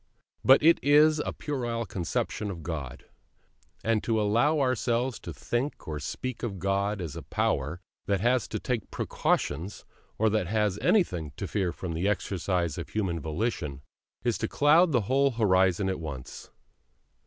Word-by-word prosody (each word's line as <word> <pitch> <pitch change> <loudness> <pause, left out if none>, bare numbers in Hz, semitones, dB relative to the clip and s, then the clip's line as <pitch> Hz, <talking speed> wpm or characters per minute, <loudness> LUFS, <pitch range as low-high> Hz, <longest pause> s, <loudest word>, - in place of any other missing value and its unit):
But 135 +2 +6
it 165 +2 +6
is 150 +2 +5
a - - -2
puerile 120 -5 -3
conception 95 +2 -2
of 85 -4 -6
God; 75 -6 -5 0.8
and 110 -1 +1
to 115 -2 +1
allow 120 +9 +2
ourselves 125 -1 0
to - - -7
think 125 +5 -3
or 75 -1 -3
speak 125 - -5
of 105 -6 -3
God 100 +2 0
as 85 -6 -5
a - - -5
Power 75 +6 -1 0.3
that 100 -2 +1
has 120 +4 +2
to 110 - -3
take 120 -5 -3
precautions, 90 +5 -1 0.3
or 110 - +3
that 105 -5 0
has 105 -1 0
anything 90 - +1
to 95 - -4
fear 95 -4 0
from 85 -1 -5
the 85 +5 -1
exercise 90 -5 -1
of - - -6
human 95 -6 -1
volition, 75 - -3 0.4
is 120 -2 0
to 110 - -1
cloud 160 +7 +4
the 125 -5 +3
whole 135 +6 +2
horizon 95 -4 +3
at 95 -2 -1
once. 75 -6 -7
105 Hz, 160 wpm, -28 LUFS, 90-125 Hz, 0.8 s, But